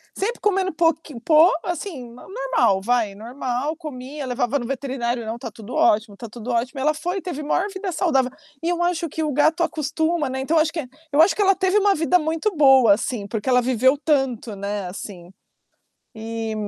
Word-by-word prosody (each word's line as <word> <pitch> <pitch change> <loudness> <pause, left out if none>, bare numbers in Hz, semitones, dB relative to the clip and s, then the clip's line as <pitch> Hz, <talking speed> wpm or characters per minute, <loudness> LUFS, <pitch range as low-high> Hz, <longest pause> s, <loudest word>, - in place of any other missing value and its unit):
Sempre 455 +5 -2
comendo, 385 -2 +1
pouqui 320 -4 0
po 310 +7 +5
assim, 330 -9 -5
normal, 405 - 0
vai, 225 -2 0
normal, 250 +6 -3
comia. 290 -2 -7
Levava 250 +2 0
no 240 - -5
veterinário: 250 -3 -3
"Não, 225 +1 -4
tá 245 - -6
tudo 220 +3 -10
ótimo, 210 -1 +2
tá 230 +3 -8
tudo 240 +2 -6
ótimo". 250 +4 -1
E - - -3
ela 305 +3 +2
foi 355 +5 -3
e - - -4
teve 340 -5 -5
a - - -7
maior 360 +6 +1
vida 380 -1 -4
saudável. 270 -8 +1 0.3
E 335 - -1
eu 350 0 0
acho 345 -2 -1
que 320 +1 -3
o 300 - -1
gato 310 +5 +3
acostuma, 315 0 -1
né, 260 +1 -3
então, 315 +4 +2
eu 310 - +4
que 330 - -4
é - - -9 0.3
eu 290 - +5
acho 375 - +2
que 420 - -1
ela 390 -1 +4
teve 375 +2 +2
uma 405 -1 +3
vida 330 +3 +2
muito 325 +5 -1
boa, 265 -7 +6
assim, 215 0 -3
porque 210 +3 -3
ela 250 -1 +4
viveu 260 +3 +3
tanto, 270 -7 0
né, 200 0 -4
assim. 180 -1 -9 0.8
E, 225 0 -5
275 Hz, 205 wpm, -22 LUFS, 235-330 Hz, 0.8 s, boa